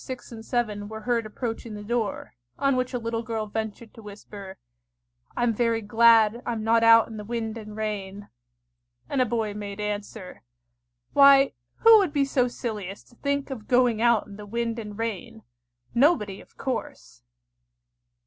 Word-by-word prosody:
6 255 -1 -8
and 225 -1 -9
7 215 -4 -2
were 220 +1 -8
heard 235 -1 0
approaching 225 0 -5
the 205 - -8
door, 220 -2 -3 0.2
on 275 -1 +2
which 255 0 -1
a 250 - -2
little 230 -1 -3
girl 225 -2 -3
ventured 220 +1 -5
to 225 - -13
whisper, 200 -2 -10 0.8
"I'm 240 -1 +2
very 230 0 +1
glad 225 +1 +5
I'm 230 -2 -3
not 230 +1 +3
out 230 0 +7
in 225 - -9
the 210 - -6
wind 225 0 -4
and 215 -1 -9
rain;" 205 -2 -4 0.8
and 275 - 0
a 250 - +2
boy 220 -2 -1
made 205 -1 -7
answer, 210 -2 -5 0.7
"Why, 275 -1 +7 0.3
who 455 -1 +8
would 370 -7 0
be 285 -2 +2
so 255 -2 +1
silly 220 -5 -5
as 195 +2 -9
to 240 - -21
think 280 -1 -2
of 225 -5 -7
going 245 -3 +3
out 235 -3 +3
in 200 -1 -12
the 210 -1 -10
wind 230 +1 -2
and 210 -2 -8
rain? 225 0 -5 0.5
Nobody, 235 - +2
of - - -21
course!" 260 - -5
225 Hz, 170 wpm, -25 LUFS, 210-240 Hz, 0.8 s, who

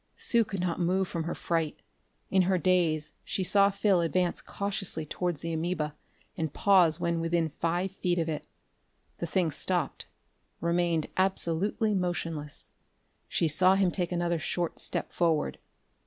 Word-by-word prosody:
Sue 235 -1 +3
could 195 -2 -5
not 180 -1 -1
move 185 +2 +1
from 165 -2 -3
her 170 - -3
fright. 165 -3 -1 0.5
In 190 - +5
a 185 - +3
daze 170 -4 +2
she 190 - -2
saw 200 +2 +4
Phil 200 -2 +2
advance 170 +2 0
cautiously 195 -5 -3
towards 175 0 -2
the 165 0 -3
amoeba 160 -2 -2 0.4
and 160 -2 -2
pause 180 -4 +4
when 170 -1 0
within 165 -1 0
five 175 +3 0
feet 180 -2 -1
of 165 -1 0
it. 155 -2 -4 0.7
The 170 - -2
thing 170 -1 +1
stopped; 175 -1 -1 0.5
remained 170 -1 +1
absolutely 190 +3 +1
motionless. 165 -5 -3 0.6
She 165 - +1
saw 185 +5 +4
him 195 -2 +3
take 180 -2 -1
another 175 -1 0
short 175 +1 -2
step - - -3
forward. 165 -3 +1
175 Hz, 150 wpm, -29 LUFS, 165-185 Hz, 0.7 s, In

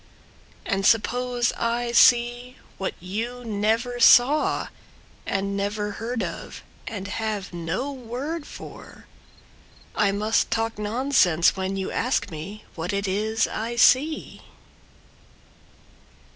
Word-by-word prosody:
And 195 0 -1
suppose 245 +3 +2
I 235 +1 -1
see 240 +1 +4 0.2
what 190 - -3
you 230 +7 -5
never 225 +3 0
saw 250 +5 +5 0.6
And 200 0 -1
never 205 +1 -2
heard 230 +3 -3
of - - -7 0.2
and 200 -3 -5
have 205 -2 -3
no 175 - -3
word 270 +6 -5
for, - - -11 0.9
I 200 -1 +2
must 210 +3 +1
talk 225 -1 -1
nonsense 210 - +2
when 190 0 -3
you 190 - -3
ask 245 -5 -1
me 190 +7 -8
What 175 +4 -4
it 200 0 -1
is 215 +3 0
I 230 +2 -4
see! 280 +6 +3
225 Hz, 110 wpm, -24 LUFS, 200-245 Hz, 0.9 s, saw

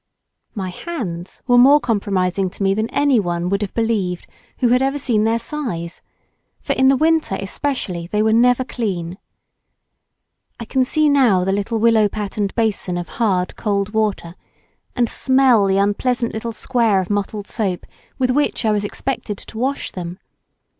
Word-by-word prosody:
My 190 -3 -3
hands 180 - -6
were 245 -1 +5
more 280 +4 +7
compromising 195 -5 0
to 195 - -6
me 195 0 +3
than 220 +3 -1
anyone 185 -12 +1
would 200 +2 0
have 205 - -4
believed 210 -6 -1 0.3
who 245 - +2
had 250 +2 +3
ever 270 +2 0
seen 235 -6 +1
their 225 +1 +2
size, 230 - -5 0.6
for, - - -2
in 265 - +3
the 270 0 +5
winter 315 -9 +1
especially, 195 -5 -3
they 210 +3 0
were 220 0 +2
never 245 +2 +4
clean. 190 -8 -4 1.4
I 230 - -6
can 260 +3 +1
see 305 +3 +2
now 250 -11 +4
the 190 - 0
little 205 +3 -1
willow 220 -2 +4
patterned 205 -1 -3
basin 210 -5 -1
of 175 -2 -5
hard 185 -6 +1
cold 200 -1 -1
water, 210 -6 -1 0.6
and 240 -2 +2
smell 260 -5 +3
the 195 0 +2
unpleasant 235 +4 0
little 225 +1 -4
square 230 -3 +1
of 185 +1 -3
mottled 205 0 -2
soap 195 -7 -2 0.3
with 255 -1 +1
which 285 -3 0
I 215 - +3
was 210 -1 0
expected 210 -1 -4
to 220 - -10
wash 270 +3 -2
them. 175 -1 -6
215 Hz, 165 wpm, -19 LUFS, 195-250 Hz, 1.4 s, more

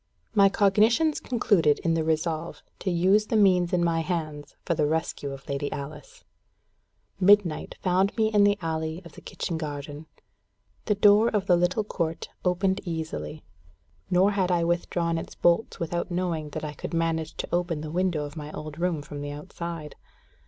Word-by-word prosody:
My 200 -2 +6
cognitions 220 +11 +3
concluded 195 - +2
in 165 - +2
the 165 -1 +1
resolve 160 +1 -2 0.2
to 190 - -2
use 190 +5 +3
the - - -1
means 180 -4 +4
in 175 -1 +2
my 165 -1 +1
hands 155 -4 -4
for 170 - +1
the 150 -3 +1
rescue 155 -2 -2
of 135 0 -9
Lady 140 +1 -2
Alice. 145 +1 -8 1.0
Midnight 195 -4 +3
found 190 +3 +2
me 220 -1 +2
in 205 -1 +5
the 205 0 +4
alley 160 +2 -3
of 170 - -11
the - - -13
kitchen 165 -2 -4
garden. 145 0 -6 0.8
The 210 - +2
door 210 +2 +5
of 205 -3 0
the 180 - +5
little 175 +5 +1
court 165 -5 -3
opened 190 +1 +1
easily. 160 -2 -5 0.7
Nor 185 +3 +4
had 190 -3 0
I 175 -2 +2
withdrawn 170 -1 0
its - - -9
bolts 175 +6 +1
without 170 +1 -2
knowing 175 -4 -2
that 155 +1 -6
I 150 - -5
could 165 - -6
manage 165 -1 -1
to - - -3
open 175 -3 0
the 155 0 -6
window 175 -3 0
of 145 +1 -9
my 150 -1 -7
old 155 +1 -7
room 170 -4 -1
from 145 0 -7
the 145 - -4
outside. 150 +1 -7
170 Hz, 175 wpm, -26 LUFS, 155-190 Hz, 1.0 s, My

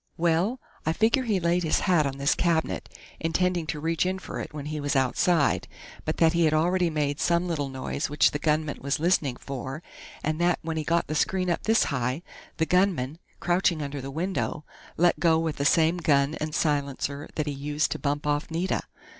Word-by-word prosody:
Well, 175 +9 +1 0.2
I 160 - 0
figure 230 - +2
he 210 -5 +1
laid 170 +1 +1
his 160 -3 +1
hat 175 -7 +3
on 135 0 -5
this 140 +1 +2
cabinet, 165 -2 0 0.3
intending 175 0 0
to 150 - -3
reach 165 +1 0
in 185 +1 -1
for - - -7
it - - -6
when 150 -2 -7
he 155 0 -4
was 145 -1 -1
outside, 140 +4 +2 0.4
but - - -2
that 165 -1 +4
he 170 -1 +3
had 155 0 +3
already 175 +2 +2
made 150 -2 -1
some 170 +1 +2
little 145 -5 -2
noise 130 +1 -3
which 150 - +4
the 145 - -3
gunman 155 -1 0
was 140 +3 -1
listening 160 -6 +2
for, 135 +4 -6 0.4
and 155 +2 -1
that 175 0 +3
when 160 0 -3
he 155 - -1
got 170 +2 +1
the - - -4
screen 185 +3 +1
up 170 - -1
this 225 +1 +4
high, 130 +4 -1 0.3
the 160 - +2
gunman, 170 -6 +1 0.2
crouching 175 -3 +1
under 140 -1 -5
the 135 - -6
window, 160 0 -2 0.3
let 175 +1 +3
go 165 -2 +4
with 160 -2 -1
the 140 - -1
same 160 +3 +4
gun 145 -4 +2
and 155 0 -3
silencer 145 -2 -1
that 155 - -1
he 145 - -2
used 145 +2 -1
to - - -2
bump 145 0 -1
off 145 0 0
Nita.... 170 +3 -1
160 Hz, 205 wpm, -26 LUFS, 145-175 Hz, 0.4 s, that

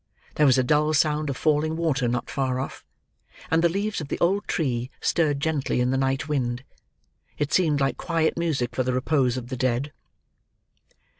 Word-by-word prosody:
There 150 - +3
was 130 -1 +5
a 130 - +3
dull 150 +4 +2
sound 150 0 +1
of 135 - -3
falling 155 +1 +1
water 150 -7 0
not 120 0 -2
far 130 -2 -1
off; 135 - -6 0.7
and 165 +1 +3
the 170 - +5
leaves 200 +2 -2
of 150 - -6
the - - -3
old 195 +4 +1
tree 125 -6 -1
stirred 150 -4 +1
gently 145 -4 -1
in 125 +1 +1
the - - +1
night 135 +2 0
wind. 130 -4 -1 0.7
It 145 +1 -2
seemed 155 -6 +3
like 135 0 0
quiet 165 -2 0
music 155 -8 -1
for - - +1
the 130 0 0
repose 130 -1 +1
of 120 -1 -6
the 130 - -4
dead. 130 +3 -1
145 Hz, 190 wpm, -25 LUFS, 130-160 Hz, 0.7 s, was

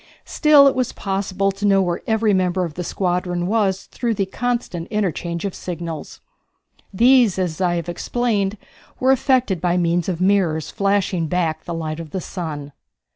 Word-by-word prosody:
Still 300 -2 +5
it 275 - +4
was 255 -2 -1
possible 195 0 -1
to 195 +1 -10
know 195 -1 +4
where 175 -2 0
every 220 -1 +2
member 185 -1 +1
of 165 - -7
the 180 - -4
squadron 180 -1 -1
was 195 -2 +1
through 235 -2 -3
the 195 - 0
constant 235 -5 -3
interchange 175 -4 -2
of 195 - -3
signals. 170 -3 -6 0.7
These, 235 0 +4
as 180 -3 -2
I 175 -1 +2
have 170 0 -3
explained, 205 +2 -1 0.4
were 260 +1 +4
effected 255 - +2
by 175 0 +1
means 175 0 +1
of 175 -3 -2
mirrors 185 -5 +1
flashing 195 -4 0
back 160 -2 -1
the 170 - -4
light 155 -1 -4
of 165 -2 -7
the 190 - -3
sun. 155 -6 -6
185 Hz, 170 wpm, -21 LUFS, 175-210 Hz, 0.7 s, Still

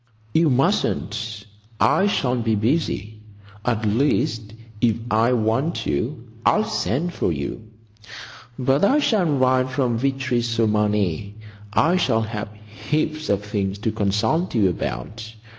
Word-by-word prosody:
"You 160 -1 +4
mustn't. 115 - 0 0.3
I 195 - +4
shall 130 -10 +1
be 115 -2 +1
busy. 110 - -1 0.4
At 115 -2 0
least, 110 -2 0 0.3
if 115 -3 +3 0.2
I 115 +3 +3
want 120 +8 0
you 125 -1 -2 0.2
I'll 215 - +4
send 175 - -1
for - - 0
you. 80 +10 -5 0.9
But 135 +4 +1
I 265 +9 +5
shall 220 -10 +2
write 130 -3 +2
from 130 -3 0
Vitry 130 -2 0
sur 115 -1 0
Marne. 105 -3 0 0.4
I 160 - +3
shall 115 -10 +2
have 110 -1 -5 0.4
heaps 155 0 -1
of 100 0 0
things 100 -2 -2
to 105 +2 -1
consult 110 - 0
you 100 -4 +4
about. 110 - -5
115 Hz, 130 wpm, -22 LUFS, 105-140 Hz, 0.9 s, I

